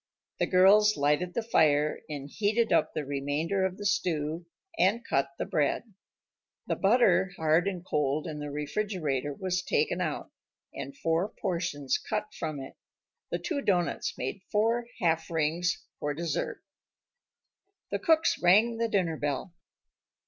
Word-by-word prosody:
The -, -, +2 dB
girls 205 Hz, +3 st, +5 dB
lighted 150 Hz, +5 st, +1 dB
the 235 Hz, -, 0 dB
fire 150 Hz, -8 st, +3 dB
and 140 Hz, -2 st, -5 dB
heated 215 Hz, +7 st, +1 dB
up -, -, +3 dB
the 150 Hz, -, -2 dB
remainder 145 Hz, +7 st, -1 dB
of 190 Hz, 0 st, -1 dB
the 205 Hz, -, -7 dB
stew 165 Hz, -4 st, -1 dB, 0.3 s
and 225 Hz, +5 st, +2 dB
cut 140 Hz, 0 st, +1 dB
the -, -, -2 dB
bread. 155 Hz, +9 st, -1 dB, 0.7 s
The -, -, -1 dB
butter, 200 Hz, -3 st, +3 dB
hard 160 Hz, +3 st, +3 dB
and 185 Hz, -3 st, -3 dB
cold 150 Hz, -2 st, 0 dB
in 155 Hz, -3 st, -5 dB
the 145 Hz, 0 st, -5 dB
refrigerator, 150 Hz, -2 st, -2 dB
was 185 Hz, +4 st, -2 dB
taken -, -, 0 dB
out, -, -, -3 dB, 0.4 s
and 140 Hz, 0 st, -7 dB
four 165 Hz, +6 st, 0 dB
portions 155 Hz, -9 st, -2 dB
cut 210 Hz, 0 st, -3 dB
from 155 Hz, -2 st, -4 dB
it. 135 Hz, -, -9 dB, 0.5 s
The -, -, -1 dB
two 295 Hz, -5 st, -3 dB
doughnuts 180 Hz, -8 st, 0 dB
made 130 Hz, +10 st, -4 dB
four 230 Hz, +3 st, +1 dB
half 165 Hz, -2 st, +1 dB
rings 165 Hz, +2 st, 0 dB
for 145 Hz, 0 st, -2 dB
dessert. 165 Hz, +1 st, -3 dB, 1.3 s
The -, -, -1 dB
cooks 325 Hz, -4 st, +3 dB
rang 215 Hz, +6 st, +5 dB
the 230 Hz, 0 st, +1 dB
dinner 175 Hz, -6 st, 0 dB
bell. 145 Hz, +4 st, -3 dB
170 Hz, 145 wpm, -29 LUFS, 150-205 Hz, 1.3 s, girls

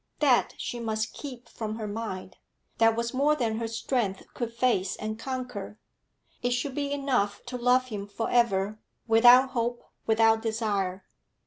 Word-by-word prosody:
That 270 Hz, -5 st, +3 dB
she 240 Hz, -, -4 dB
must 220 Hz, -1 st, -2 dB
keep 255 Hz, -4 st, -8 dB
from 215 Hz, -1 st, -5 dB
her 220 Hz, -1 st, -5 dB
mind; 205 Hz, -4 st, -5 dB, 0.4 s
that 225 Hz, 0 st, +5 dB
was 235 Hz, +1 st, -2 dB
more 285 Hz, +3 st, +3 dB
than 230 Hz, -5 st, -1 dB
her 230 Hz, -, -2 dB
strength 225 Hz, -3 st, -1 dB
could 235 Hz, -2 st, -3 dB
face 230 Hz, -6 st, +1 dB
and 215 Hz, +1 st, -5 dB
conquer. 250 Hz, -5 st, -5 dB, 0.6 s
It 245 Hz, 0 st, +1 dB
should 255 Hz, +3 st, -2 dB
be 285 Hz, 0 st, -2 dB
enough 255 Hz, -8 st, 0 dB
to 250 Hz, +1 st, -6 dB
love 250 Hz, +1 st, +3 dB
him 205 Hz, -3 st, -5 dB
for 205 Hz, +3 st, -3 dB
ever, 215 Hz, -3 st, +2 dB, 0.3 s
without 245 Hz, +3 st, +7 dB
hope, 240 Hz, 0 st, -2 dB, 0.2 s
without 225 Hz, 0 st, +4 dB
desire. 205 Hz, -4 st, -1 dB
230 Hz, 155 wpm, -28 LUFS, 215-250 Hz, 0.6 s, without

